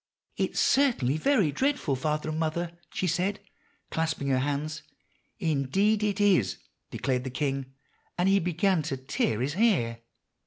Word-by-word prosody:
'It - - 0
is - - -1
certainly 235 - +3
very 200 - +2
dreadful, 260 - 0
father 150 +3 -2
and 155 0 -2
mother,' 165 +2 -1 0.2
she - - -2
said, 185 +4 0 0.5
clasping 160 -3 -1
her 130 -1 +3
hands. 145 +2 -2 0.6
"'Indeed 190 +6 +1
it 210 -1 0
is,' 185 - +3 0.3
declared 125 -1 -1
the 130 - -4
king; 135 0 -2 0.4
and 180 +1 +2
he 195 +1 +5
began 180 +1 +1
to 145 -3 -3
tear 130 -4 -1
his 140 +3 -1
hair. 170 - +2
155 Hz, 150 wpm, -28 LUFS, 135-195 Hz, 0.6 s, he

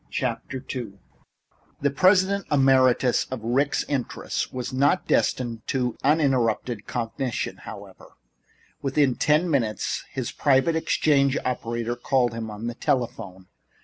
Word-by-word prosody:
II 125 -2 -4 0.9
The 140 0 +2
President 190 +5 +3
emeritus 130 -3 +4
of 130 -4 -6
the - - -5
Ricks' 140 +4 +1
interests 140 -4 -3
was 125 +1 -5
not 140 +7 +2
destined 120 -3 0
to 125 -3 -1
uninterrupted 130 -6 +1
cogitation, 120 +1 -3
however. - - -11 0.7
Within 135 -1 +2
ten 150 +7 +2
minutes 115 - -1
his - - -4
private 140 +3 +2
exchange 140 -4 +2
operator 120 -1 -2
called 120 -1 +1
him 115 -1 -5
to 105 +1 -7
the 120 - -2
telephone. 115 -7 -2
130 Hz, 115 wpm, -25 LUFS, 120-140 Hz, 0.9 s, emeritus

